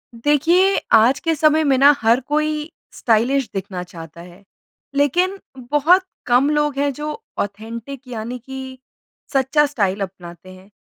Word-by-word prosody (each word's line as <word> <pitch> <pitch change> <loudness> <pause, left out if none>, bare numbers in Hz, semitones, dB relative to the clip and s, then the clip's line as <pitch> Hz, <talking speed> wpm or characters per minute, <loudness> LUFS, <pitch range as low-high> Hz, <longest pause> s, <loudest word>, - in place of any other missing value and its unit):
देखिए, 335 +10 +2 0.2
आज 240 +5 +5
के 330 -2 0
समय 310 +1 +3
में 275 -3 +2
ना 280 +2 +7
हर 230 +3 +3
कोई 305 +1 -1 0.2
स्टाइलिश 245 +3 +1
दिखना 190 -2 -5
चाहता 165 -2 -11
है, 175 +3 -15 0.5
लेकिन 350 +8 +1 0.3
बहुत 330 +6 +4 0.2
कम 250 +4 +3
लोग 295 -2 0
हैं 285 0 +1
जो 300 +3 -5 0.3
ऑथेंटिक 225 +6 -6
यानी 235 0 -5
कि 265 +1 -9 0.6
सच्चा 275 +3 +3
स्टाइल 205 -9 -1
अपनाते 180 -2 -8
हैं। 185 +2 -17
265 Hz, 140 wpm, -20 LUFS, 215-295 Hz, 0.6 s, ना